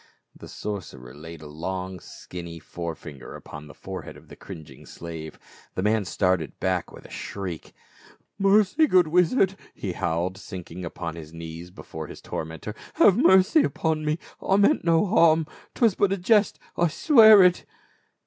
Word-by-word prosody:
The - - -12
sorcerer 70 -12 -7
laid 80 +1 -10
a - - -9
long 90 +4 -5
skinny 85 -1 -9
fore 85 +1 -6
finger 75 -4 -10
upon 75 +1 -10
the 75 - -13
forehead - - -8
of - - -18
the - - -11
cringing 75 -5 -11
slave; 80 -2 -8 0.4
the 95 - -2
man 105 0 +1
started 90 -4 -1
back 90 -2 -1
with - - -13
a - - -13
shriek. 95 -5 -6 0.4
" - - -21 0.3
Mercy, 205 +9 +4
good 180 - +4
wizard 180 +3 +3
!" - - -30
he 95 - -4
howled, 85 +2 -2
sinking 90 -3 -8
upon 85 -1 -5
his 80 -1 -10
knees 85 +1 -8
before 80 -4 -9
his - - -10
tormentor, 80 +6 -6 0.2
" - - -26
have 195 - +6
mercy 210 - +5
upon 160 - -1
me, 150 +1 0 0.2
I 195 - +2
meant 205 +10 +3
no 165 +2 +3
harm; 165 -6 +4 0.3
'twas 230 -5 +3
but 195 +1 +1
a 195 - +1
jest 205 +2 +3
— - - -31
I 175 - +4
swear 220 - +7
it 180 -1 +3
95 Hz, 175 wpm, -25 LUFS, -, 0.4 s, swear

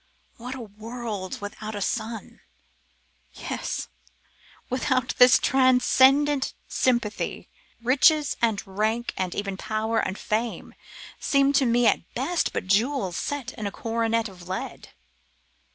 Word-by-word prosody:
What 250 +3 -6
a 260 - -7
world 220 0 -6
without 215 +1 -6
a - - -3
sun! 220 +1 -4 0.9
Yes! - - -4 0.8
without 255 0 0
this 250 0 +8
transcendent 265 +2 +4
sympathy, 235 -5 -1 0.3
riches 285 +4 +4
and 225 -3 +1
rank, 215 +4 -1
and 185 -2 -2
even 200 -2 -3
power 220 +2 -1
and 190 -1 -2
fame, 225 +2 -3 0.5
seem 275 0 +3
to 270 -2 +3
me 240 +1 +3
at - - +1
best 350 -1 0
but - - -3
jewels 200 0 +1
set 285 +4 -3
in 210 - -4
a - - -4
coronet 230 +1 -1
of 180 -3 -13
lead! 190 - -5
230 Hz, 120 wpm, -25 LUFS, 210-260 Hz, 0.9 s, this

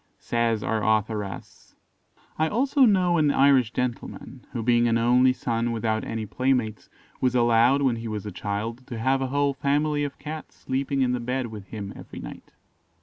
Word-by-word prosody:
Says 115 -2 0
our 110 -1 -1
authoress: 105 -3 -2 0.6
"I 160 - +3
also 265 +4 +3
know 180 -6 +3
an 150 -1 +3
Irish 135 -4 +4
gentleman, 125 +1 -4
who 115 -3 -4
being 120 0 +3
an 115 0 +2
only 125 +2 +4
son 120 -2 -1
without 110 -1 -1
any 110 -1 -4
playmates, 125 -2 -1 0.3
was 125 -1 +1
allowed, 120 +3 +4
when 125 -4 +2
he 115 0 -6
was 105 -1 -4
a 105 - -5
child, 110 +6 -4
to 120 - -6
have 130 +4 +1
a 135 - 0
whole 140 +1 +1
family 145 +2 0
of 145 -1 -4
Cats 155 0 -8
sleeping 135 +1 -2
in 125 - +1
the 125 - -1
bed 125 +2 -2
with 105 -3 -9
him 100 -3 -6
every - - -11
night. - - -9
125 Hz, 180 wpm, -25 LUFS, 115-140 Hz, 0.6 s, Irish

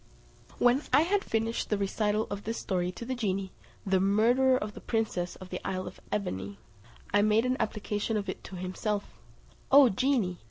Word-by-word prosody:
When 245 +3 +4
I - - +6
had 390 +4 +1
finished 225 +1 -1
the 210 - +1
recital 210 +2 0
of 205 0 -4
this 225 +2 -3
story 180 -3 -1
to 235 - -7
the 260 - -2
genie, 195 -5 -2 0.3
the 190 -1 +2
murderer 235 +7 +4
of 210 -3 -4
the - - -10
princess 215 -6 -1
of 185 -1 -12
the 180 - -4
isle 185 -1 -3
of - - -9
Ebene, 100 - -3 0.6
I 205 - +5
made 215 +3 +3
an 255 0 +1
application 210 +1 -1
of 200 -1 -3
it 185 - -5
to 190 - -8
himself: 185 +3 -3 0.5
"O 275 -2 +8
genie!" 220 -5 +1
210 Hz, 185 wpm, -29 LUFS, 190-230 Hz, 0.6 s, O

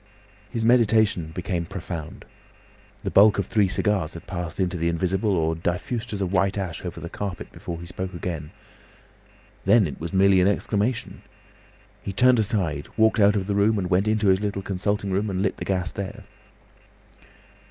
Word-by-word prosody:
His 115 -1 -2
meditation 110 -7 +3
became 85 0 -3
profound. 85 -4 -7 0.8
The - - -2
bulk 105 +1 +6
of 100 - 0
three 105 0 +2
cigars 95 -4 0
had 85 - -9
passed 85 -1 -5
into 95 -1 0
the 85 0 0
invisible 95 +4 0
or 80 0 +1
diffused 90 +9 -3
as 100 -2 -3
a - - +1
white 95 +2 +1
ash 95 -4 -4
over 90 -2 -6
the 85 - -6
carpet 95 +1 -6
before 85 -1 -7
he 85 - -8
spoke 90 +1 -5
again. 80 -4 -4 1.1
Then 105 +2 +5
it 75 - -6
was 85 +2 -5
merely 95 -1 +4
an 90 - +4
exclamation. 105 +4 -1 0.8
He 100 - -5
turned 125 +4 +4
aside, 95 - -1
walked 110 +1 +4
out 105 0 +5
of 95 -2 0
the 100 - -1
room, 105 +2 +3
and 90 -2 -2
went 95 +4 +3
into 110 -2 +2
his 95 +1 +3
little 100 -2 -2
consulting 100 +1 -1
room 100 +3 0
and 95 0 -1
lit 95 - -1
the - - -5
gas 90 -2 -1
there. 100 -1 -6
95 Hz, 180 wpm, -24 LUFS, 90-105 Hz, 1.1 s, bulk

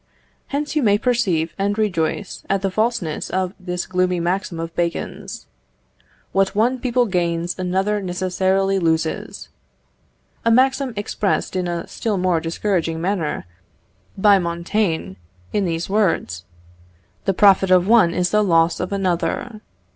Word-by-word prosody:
Hence 295 +2 -3
you 305 - +2
may 205 -4 +4
perceive 205 -9 0
and 200 +1 0
rejoice 195 -2 -1
at 195 0 0
the 195 - 0
falseness 215 -7 -1
of 185 0 -1
this 180 -1 -4
gloomy 180 -1 0
maxim 175 0 -2
of 165 0 -5
Bacon's, 170 -1 -3 0.9
"What 195 +1 +1
one 245 +5 +2
people 250 0 +1
gains, 175 -3 -1
another 190 +3 0
necessarily 190 +1 0
loses:" 160 -2 -1 0.9
a 230 - +2
maxim 265 +2 +3
expressed 205 -1 -1
in 180 -1 -1
a 170 -1 -3
still 215 -3 -2
more 180 -2 +1
discouraging 165 0 -1
manner 175 - -2 0.7
by 200 0 +5
Montaigne, 170 - -1 0.4
in 205 -2 +1
these 165 -1 -2
words: 185 - 0 0.8
"_The 195 - +1
profit 195 -2 +5
of 185 0 +4
one 220 -7 +5
is 180 0 0
the 210 0 +3
loss 165 -3 +3
of 180 - -3
another. 200 +4 -2
185 Hz, 135 wpm, -21 LUFS, 170-210 Hz, 0.9 s, by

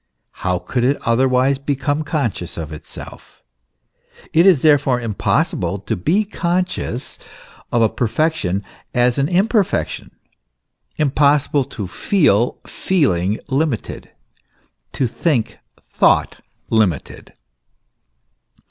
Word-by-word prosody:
How 90 -1 0
could 120 +7 -2
it 135 +3 +2
otherwise 130 +3 +2
become 145 +2 -1
conscious 120 - -3
of 80 -2 -5
itself? 75 - -11 0.9
It 170 +4 +5
is 175 -9 +5
therefore 140 -5 +4
impossible 105 -3 -1
to 105 +3 -3
be 170 - +1
conscious 180 - -2 0.5
of 120 -1 +3
a - - +5
perfection 120 - -1 0.3
as 125 +1 +3
an 140 +2 +1
imperfection, 200 +3 0 0.9
impossible 145 -1 +2
t 110 -6 -6
feel 120 - +1
feeling 105 - 0
limited, 140 -3 -2 0.8
to 130 - 0
think 125 -1 -1 0.3
thought - - +2 0.3
limited. 105 -10 -1
130 Hz, 95 wpm, -19 LUFS, 110-155 Hz, 0.9 s, It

